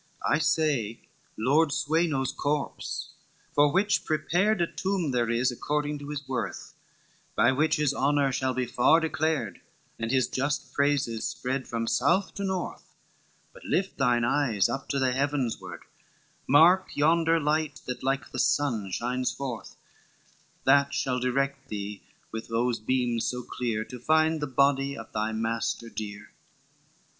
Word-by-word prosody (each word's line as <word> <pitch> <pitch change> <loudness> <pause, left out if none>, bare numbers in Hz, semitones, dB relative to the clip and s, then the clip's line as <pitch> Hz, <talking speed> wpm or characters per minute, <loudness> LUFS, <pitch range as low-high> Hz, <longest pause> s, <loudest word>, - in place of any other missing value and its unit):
XXXI - - +3
"'I - - 0
say 150 -8 +1 0.4
Lord 145 +7 +3
Sweno's 150 -3 +1
corpse, 145 0 -3 0.4
for 145 0 +4
which 200 +3 +2
prepared 175 +7 +1
A 170 - +3
tomb 185 -3 -2
there 120 -2 +1
is 120 +2 +2
according 150 +3 -2
to 145 0 -8
his 145 -2 -5
worth, 130 -1 -4 0.6
By 120 +4 +4
which 150 +4 +2
his 150 -2 +1
honor 140 0 +2
shall 130 0 -1
be 130 -1 0
far 125 +6 +4
declared, 155 - -1 0.4
And 115 0 -2
his 130 0 +2
just 140 0 -2
praises 140 -6 +1
spread 130 +1 -3
from 115 -1 -2
south 175 - +1
to 200 - -5
north:" 190 -2 -3 0.7
But - - -15
lift 195 0 -1
thine 120 -1 +3
eyes 120 -5 +2
up 135 +3 -4
to 140 - 0
the 130 -2 +2
heavens 135 -2 -1
ward, - - -9 0.7
Mark 175 +7 +6
yonder 165 +2 +3
light 150 0 -1
that 125 - -5
like 135 -1 -1
the - - -4
sun 115 -9 +1
shines 125 +6 -1
forth 130 -5 -6 0.9
That 140 +1 +4
shall 125 -1 0
direct 135 +2 -1
thee 105 -1 -5 0.3
with 110 0 -6
those 115 +1 0
beams 120 0 0
so 125 0 -2
clear, 115 -4 -2
To 125 - -9
find 155 +3 +2
the 150 - -1
body 140 +1 +2
of 115 - -9
thy 110 +1 -1
master 115 +1 -2
dear. 105 -2 -7
135 Hz, 150 wpm, -27 LUFS, 120-150 Hz, 0.9 s, Mark